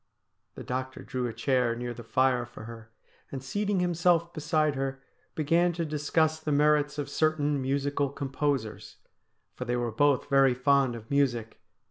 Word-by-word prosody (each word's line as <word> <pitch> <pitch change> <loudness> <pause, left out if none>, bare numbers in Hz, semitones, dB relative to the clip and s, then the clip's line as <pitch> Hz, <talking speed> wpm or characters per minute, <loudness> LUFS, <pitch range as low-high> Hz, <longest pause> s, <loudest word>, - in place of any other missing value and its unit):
The - - -8
doctor 130 +1 -4
drew 125 -1 -3
a 115 - -5
chair 120 0 +1
near 120 0 -4
the 120 - -9
fire 130 +1 +2
for 120 -2 -11
her, 115 0 -11 0.4
and, 135 -2 -6
seating 205 +6 -1
himself 175 -1 +2
beside 155 -1 +1
her, 135 0 -3 0.4
began 170 +3 +2
to 170 0 -2
discuss 155 +1 0
the 155 -1 -3
merits 150 0 +3
of 145 -2 -3
certain 150 -1 +1
musical 140 +1 0
composers, 135 -4 -3 0.6
for - - -6
they 120 - -1
were 120 -1 -1
both 145 +3 +2
very 135 -2 +4
fond 135 -1 +2
of 110 +1 -11
music. 120 -6 0
140 Hz, 160 wpm, -28 LUFS, 125-150 Hz, 0.6 s, very